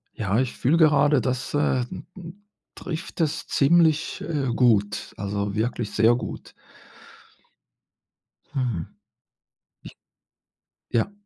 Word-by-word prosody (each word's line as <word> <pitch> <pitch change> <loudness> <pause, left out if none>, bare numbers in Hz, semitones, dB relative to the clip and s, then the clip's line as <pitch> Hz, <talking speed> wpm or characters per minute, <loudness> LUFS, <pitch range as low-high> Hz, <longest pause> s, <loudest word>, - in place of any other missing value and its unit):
Ja, 105 0 0
ich 130 -2 -2
fühle 145 +7 +2
gerade, 150 -3 +4
das, 130 +2 -3
äh, 145 -3 +2
m - - -8
m 185 +3 -11 0.3
trifft 165 0 -7
es 155 -3 -1
ziemlich, 160 +1 +2
äh, 145 -5 -2
gut, 105 -5 +1
also, 100 0 -3
wirklich 110 0 -2
sehr 115 +3 +4
gut. 120 - -6 2.0
Hm. 120 - -2 2.0
Ich - - -6
ja. 195 - 0
130 Hz, 105 wpm, -24 LUFS, 110-155 Hz, 2.0 s, gerade